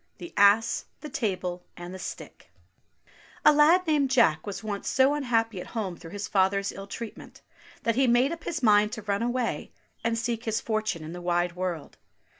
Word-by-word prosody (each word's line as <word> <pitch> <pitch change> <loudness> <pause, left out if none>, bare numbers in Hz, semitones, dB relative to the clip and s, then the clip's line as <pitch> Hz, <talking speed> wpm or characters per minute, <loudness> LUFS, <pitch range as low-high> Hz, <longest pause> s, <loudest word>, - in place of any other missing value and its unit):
THE 345 - -9
ASS, 205 +3 +4 0.2
THE 300 - -7
TABLE, 185 -8 -2 0.2
AND 175 +1 -8
THE 190 - -8
STICK - - -8 1.0
A 300 - +8
LAD 320 +5 +5
named 295 -4 +2
Jack 230 -11 +3
was 195 0 -5
once 205 -2 -4
so 265 +2 +4
unhappy 230 -8 0
at - - -9
home 190 -5 -2
through 165 - -11
his 205 +3 -5
father's 195 0 +1
ill 195 0 -9
treatment, 225 +2 -9 0.4
that 230 - +2
he 265 +3 +2
made 245 +4 +4
up 335 -1 -6
his 310 -5 -4
mind 210 -1 +5
to 220 -3 -6
run 200 0 -1
away 245 0 -2 0.3
and 230 0 0
seek 235 0 -2
his 220 0 0
fortune 215 -7 -2
in 160 +2 -7
the 175 - -7
wide 175 0 0
world. 180 -4 -4
215 Hz, 190 wpm, -27 LUFS, 190-245 Hz, 1.0 s, A